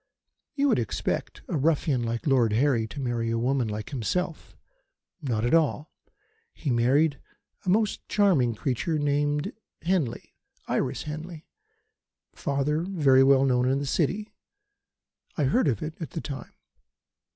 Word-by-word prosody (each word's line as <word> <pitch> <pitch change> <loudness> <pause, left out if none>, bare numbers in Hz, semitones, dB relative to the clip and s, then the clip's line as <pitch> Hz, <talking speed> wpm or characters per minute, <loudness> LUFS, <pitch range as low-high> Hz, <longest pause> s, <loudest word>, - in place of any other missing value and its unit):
"You 285 0 +2
would 235 - +3
expect 115 - -3
a - - -2
ruffian 145 -3 +1
like 115 0 -3
Lord 125 -7 +3
Harry 120 -2 +2
to 140 - -8
marry 120 -3 -1
a 115 - 0
woman 125 +1 +1
like 105 +3 -5
himself. 155 - -3 0.6
Not 120 -6 -1
at 120 - +1
all. 155 -2 +2 0.6
He 145 - -2
married 135 +6 +3 0.5
a - - 0
most 210 +3 +1
charming 160 - +3
creature 135 - -1
named 145 0 0 0.3
Henley 165 -9 -1 0.3
Iris - - -1
Henley 155 +2 -7 0.9
father 140 +2 -1
very 150 -8 +4
well 135 0 +5
known 125 -1 +2
in 135 - +2
the 140 - -2
City. 185 +9 -1 1.0
I 150 - +1
heard 150 - +2
of 115 -7 0
it 155 +2 -7
at 160 - -4
the 160 - -5
time. 140 -3 -7
140 Hz, 140 wpm, -27 LUFS, 125-160 Hz, 1.0 s, well